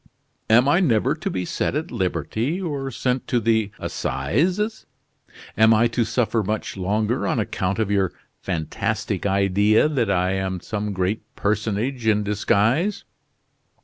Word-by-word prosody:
Am 120 +4 +5
I 145 +5 +4
never 120 - +2
to - - -4
be 90 -1 -3
set - - -2
at 155 +3 -3
liberty 115 - -1
or 145 -7 -3
sent 125 0 -2
to 120 - +1
the 110 -2 +1
assizes. 180 - -1 0.7
Am 110 +1 +5
I 115 +2 +4
to 115 +1 0
suffer 115 -1 0
much 105 +2 -3
longer 105 +5 0
on - - 0
account 100 -3 -1
of 110 -2 0
your 95 -3 +2 0.3
fantastic 85 +2 -2
idea 100 +5 +3
that 130 -8 0
I 90 -1 +1
am 95 -1 -2
some 105 +2 -4
great 95 +2 -1
personage 110 +4 -1
in 105 -1 +3
disguise?" 105 - +1
110 Hz, 145 wpm, -23 LUFS, 100-125 Hz, 0.7 s, Am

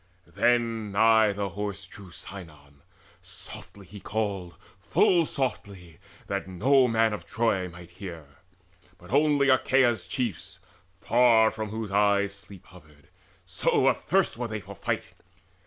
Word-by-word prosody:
Then 115 +3 0
nigh 110 +1 +4
the 100 0 -3
Horse 100 -1 -5
drew 100 -3 -13
Sinon: 75 -6 -11 0.4
softly 100 -1 -11
he 105 +3 -11
called, 100 -5 -3 0.2
Full 170 -4 +2
softly, 100 - -5 0.3
that 100 -1 -3
no 130 +8 +3
man 115 -1 +2
of 105 - -7
Troy 100 -5 0
might 85 0 -13
hear, 85 -4 -9 0.7
But 90 +1 -15
only 145 0 +3
Achaea's 130 -5 +2
chiefs, 120 -8 -4 0.4
far 115 +2 +4
from 110 -1 -5
whose 110 -1 -5
eyes 100 0 +2
Sleep 100 -2 -13
hovered, 75 -5 -19 0.4
so - - +1
athirst - - 0
were 120 0 -3
they 110 -1 -4
for 100 0 -10
fight. 95 - -3
105 Hz, 130 wpm, -27 LUFS, 95-115 Hz, 0.7 s, nigh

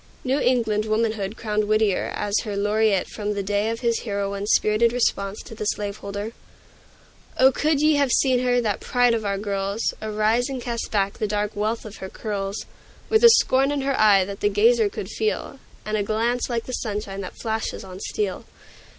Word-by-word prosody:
New 265 +2 +1
England 225 -5 +1
Womanhood 215 -1 -1
crowned 215 -1 -1
Whittier 215 -2 +1
as 205 0 0
her 210 -3 -4
laureate 210 -1 +2
from 210 -1 -4
the 200 - -2
day 205 +2 0
of 230 0 -4
his 235 -2 +1
heroine's 200 -1 -2
spirited 215 +2 +3
response 205 -4 -1
to 230 - -11
the 215 -1 -5
slaveholder: 205 0 -3 1.1
"O, 265 +1 +6
could 300 +2 +1
ye 305 -1 +4
have 280 -3 +2
seen 255 -1 +3
her 245 0 +2
that 210 -4 -1
pride 245 -1 +2
of 225 -1 -1
our 200 -1 0
girls 200 +1 -2
Arise 220 +4 +1
and 265 -2 -4
cast 235 -1 -4
back 200 -1 -1
the 215 - 0
dark 210 0 -2
wealth 215 +3 -2
of 215 -1 -9
her 190 - -7
curls, 200 -1 -4 0.4
With 440 +1 +3
a 470 - +11
scorn 270 - +4
in 290 -1 -1
her 275 0 0
eye 205 -5 +5
that 200 +1 -7
the 205 - +2
gazer 220 +2 +4
could 195 - -6
feel, 220 +5 -2 0.3
And 215 0 -2
a 210 - +1
glance 230 +5 0
like 235 -2 -2
the 255 - -6
sunshine 205 -4 -4
that 185 - -8
flashes 220 -2 -3
on 185 -1 -9
steel! 205 +1 -3
215 Hz, 195 wpm, -23 LUFS, 205-235 Hz, 1.1 s, a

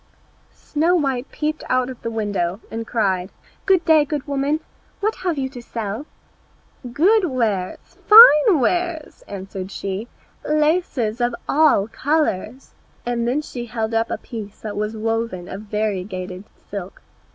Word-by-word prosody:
Snow 325 +4 0
white 270 -6 -1
peeped 305 0 -3
out 255 -1 +2
of 255 -2 -8
the 230 - -3
window 205 -5 -2
and 225 0 -5
cried, 190 -5 0 0.4
"Good 375 -3 +4
day, 320 -3 +6
good 290 -1 -4
woman, 285 +2 -1 0.4
what 430 +2 -1
have 355 -4 -2
you 265 -1 -1
to 250 -2 -9
sell?" 225 +3 -5 0.8
"Good 380 - +4
wares, 225 - -1 0.3
fine 420 -6 +9
wares," 340 +3 -1
answered 190 -1 -6
she, 200 +2 -4 0.4
"laces 300 -7 0
of 240 0 +1
all 295 -9 +4
colours;" 265 -3 -1 0.3
and 245 +4 -1
she 240 -1 -6
held 225 0 -3
up 225 0 +1
a - - -2
piece 215 -3 -9
that 215 -2 -5
was 210 +2 -3
woven 225 -5 -2
of 195 - -7
variegated 190 -3 -3 0.3
silk. 195 -2 -7
240 Hz, 140 wpm, -21 LUFS, 210-300 Hz, 0.8 s, fine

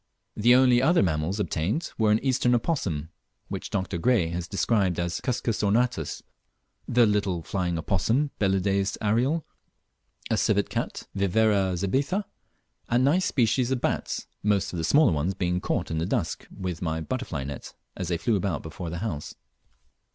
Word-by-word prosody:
The 120 +4 +5
only 125 -1 +5
other 170 +6 +4
mammals 85 +3 -1
obtained 105 - -1
were 110 -2 +2
an 105 - +5
Eastern 125 -2 +3
opossum, 95 - -1 0.4
which - - -5
Dr. 95 -2 -2
Gray 105 -5 +2
has 85 +1 -4
described 100 -2 +1
as 85 0 -2
Cuscus 120 -3 -1
ornatus; 105 -5 0 0.6
the 120 0 +4
little 100 -5 0
flying 90 -2 -2
opossum, 110 - 0
Belideus 95 0 +1
ariel; 125 +10 +1 0.9
a - - +2
Civet - - +1
cat, - - -3
Viverra 100 -1 +2
zebetha; 140 - 0 0.6
and 120 +2 +3
nice 175 +7 +3
species 120 -1 +2
of 130 -2 -1
bats, - - -2 0.2
most 105 -3 +1
of - - -3
the 80 - -2
smaller 140 - +5
ones 80 +5 -1
being 90 -1 -1
caught - - -2
in 80 - -1
the 85 - -1
dusk - - -2
with 90 -4 -5
my 80 -2 -1
butterfly 80 - -3
net 70 0 -7 0.2
as 90 - -4
they 85 0 0
flew 110 +6 +1
about 95 -3 -1
before 80 +2 -6
the 85 - -4
house. 75 -9 -5
100 Hz, 160 wpm, -26 LUFS, 85-120 Hz, 0.9 s, The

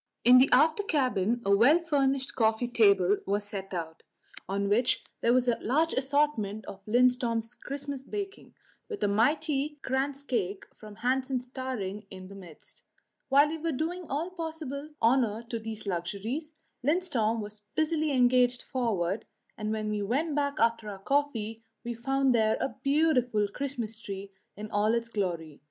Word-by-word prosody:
In 250 +1 +9
the 265 - +5
after 310 +9 +5
cabin 245 - 0
a 200 0 +5
well 250 +10 +6
furnished 275 -5 0
coffee 225 +1 +1
table 200 -5 +4
was 200 +1 0
set 195 -2 -6
out, 165 -3 -5 0.5
on 200 +1 0
which 235 +5 +2 0.2
there 235 - +3
was 255 0 +3
a 240 - +2
large 310 +8 +1
assortment 265 -7 0
of 195 0 -9
Lindström's 240 -1 +2
Christmas 280 0 -5
baking, 395 +7 -7 0.3
with 430 - -4
a - - +4
mighty 290 +7 +1
kransekake 265 -7 -1
from 215 -1 -12
Hansen's 255 +1 -1
towering 230 -6 -5
in 185 0 -9
the - - -10
midst. 180 -6 -11 0.5
While 285 +2 +5
we 320 +1 -4
were 330 +1 -1
doing 330 +5 -3
all 315 +6 -2
possible 315 -4 -5
honour 230 -2 +3
to 230 - -3
these 220 -1 -7
luxuries, 200 - -3 0.3
Lindström 260 -8 +1
was 210 0 -7
busily 315 -1 +1
engaged 250 -1 +3
forward, 210 -6 -1 0.3
and 215 -1 -3
when 215 -1 -2
we 210 -1 -1
went 275 +10 0
back 285 0 -1
after 230 -2 +1
our 200 - -6
coffee 225 -2 -1 0.2
we 240 -1 -3
found 270 +2 +1
there 220 -2 +3
a 270 - -2
beautiful 260 -8 +2
Christmas 235 -3 -4
tree 195 -1 -7 0.3
in 215 +1 -7
all 210 +2 +2
its 230 0 -2
glory. 170 -8 -3
245 Hz, 155 wpm, -29 LUFS, 210-280 Hz, 0.5 s, In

